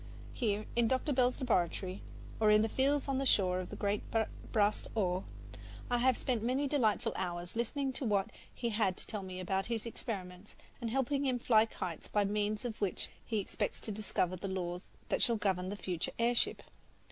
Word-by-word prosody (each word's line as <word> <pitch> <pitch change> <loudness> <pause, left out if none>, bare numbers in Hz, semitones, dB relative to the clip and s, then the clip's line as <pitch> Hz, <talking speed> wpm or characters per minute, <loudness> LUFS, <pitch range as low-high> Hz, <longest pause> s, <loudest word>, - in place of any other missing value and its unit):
Here 210 -3 0
in 235 -1 +4
Dr. 260 +4 +1
Bell's 250 -1 +3
laboratory, 185 -5 0 0.4
or 215 -1 +5
in 210 0 +6
the 220 - +1
fields 275 +4 +2
on 270 -1 +1
the 275 - 0
shore 185 -5 +3
of 185 - -5
the - - -6
great 205 0 0 0.5
Bras 210 -1 +3
d'Or, 185 -3 -1 0.7
I 245 - +3
have 255 0 +4
spent 245 -4 0
many 260 +5 +1
delightful 255 -7 +2
hours 175 0 -3
listening 265 +4 -1
to 260 - -3
what 200 -3 +1 0.2
he 235 - -2
had 210 -4 +1
to - - -5
tell 210 -3 -4
me 185 -1 -6
about 190 +1 -1
his 230 -2 -2
experiments, 195 -4 -6 0.3
and 230 - -1
helping 270 +3 +1
him 255 -1 +2
fly 225 -2 +4
kites 180 -6 -5
by 205 -1 +2
means 210 +2 0
of 225 -3 -4
which 200 -3 -1
he 225 - -2
expects 200 - -2
to 220 - -3
discover 195 -3 -1
the 185 +2 -5
laws 180 -1 -3 0.2
that - - +1
shall 235 - +3
govern 190 -3 0
the 205 - -3
future 180 -4 -3
air 235 +1 +3
ship. 240 - +1
215 Hz, 195 wpm, -34 LUFS, 190-240 Hz, 0.7 s, in